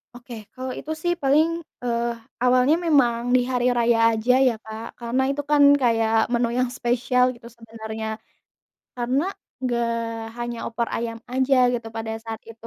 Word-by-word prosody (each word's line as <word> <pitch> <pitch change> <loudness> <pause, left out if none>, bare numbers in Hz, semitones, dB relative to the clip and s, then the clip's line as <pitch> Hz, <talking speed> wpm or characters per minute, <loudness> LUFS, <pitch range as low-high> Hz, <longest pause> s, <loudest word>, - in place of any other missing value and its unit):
Oke, 245 0 -11 0.2
kalau 255 0 -5
itu 305 - -7
sih 350 - +2
paling, 290 +4 +4 0.4
eee, 235 -1 0 0.4
awalnya 255 +4 +4
memang 255 -7 +3 0.2
di 255 - +5
hari 245 -1 0
raya 235 0 +3 0.2
aja 225 +3 +2
ya, 245 - +3
Kak, 220 +1 -7
karena 240 +2 -1
itu 290 - -2
kan 290 -1 +5 0.2
kayak 225 -2 +2 0.2
menu 240 0 +2
yang 255 -1 +1
spesial 245 +1 +1
gitu 235 -1 -14
sebenarnya, 220 -1 -7 0.9
karena 250 +5 0 0.4
enggak 240 -2 0 0.5
hanya 240 0 -4
opor 235 0 -2
ayam 230 -1 -4
aja 260 +1 +2 0.2
gitu, 235 -2 -3
pada 225 0 -4
saat 225 -1 -6
itu 230 0 -13
240 Hz, 155 wpm, -23 LUFS, 230-255 Hz, 0.9 s, di